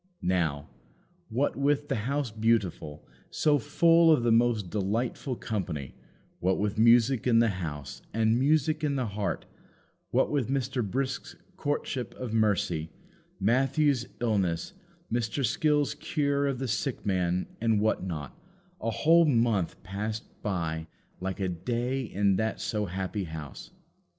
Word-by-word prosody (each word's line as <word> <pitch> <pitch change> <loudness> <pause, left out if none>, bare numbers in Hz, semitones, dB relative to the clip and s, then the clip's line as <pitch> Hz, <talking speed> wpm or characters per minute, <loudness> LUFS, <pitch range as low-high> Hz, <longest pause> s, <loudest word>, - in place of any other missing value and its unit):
Now, 85 -6 0 0.6
what 130 +6 0
with 145 +1 +1
the 125 -4 -2
House 140 -4 -1
Beautiful, 105 -9 -1 0.2
so 150 -2 +2
full 165 +7 +5
of 150 -6 +4
the 120 - +3
most 115 -5 +2
delightful 115 +6 -1
company; 85 - -4 0.5
what 95 +1 +1
with 105 +1 -1
music 120 +2 +5
in 115 -2 +5
the 115 0 +5
house 75 -4 -6
and 110 +1 +2
music 155 +2 +2
in 145 -2 +1
the 130 -2 0
heart; 105 -1 -3 0.6
what - - +2
with 140 -5 0
Mr. 135 -2 0
Brisk's 130 +6 -3 0.2
courtship 145 -6 -3
of 125 -3 -5
Mercy, 95 -7 +1 0.5
Matthew's 130 +4 +2
illness, 100 -8 0 0.4
Mr. 120 +3 0
Skill's 145 +2 +2
cure 140 -2 0
of 135 -2 -1
the 130 +1 -3
sick 115 +5 -2
man, 90 -2 +1 0.2
and 115 -2 +3
what 110 -2 +1
not 75 -7 -5 0.5
a 115 - -1
whole 165 +8 +5
month 115 - +1
passed 105 +3 -4 0.2
by 80 -5 -2 0.3
like 95 +1 -4
a 95 - 0
day 120 +9 -2
in 100 -5 +1
that 110 +1 -1
so 105 -2 -2
happy 95 +2 -3
house. 80 -4 -8
115 Hz, 140 wpm, -28 LUFS, 95-135 Hz, 0.6 s, full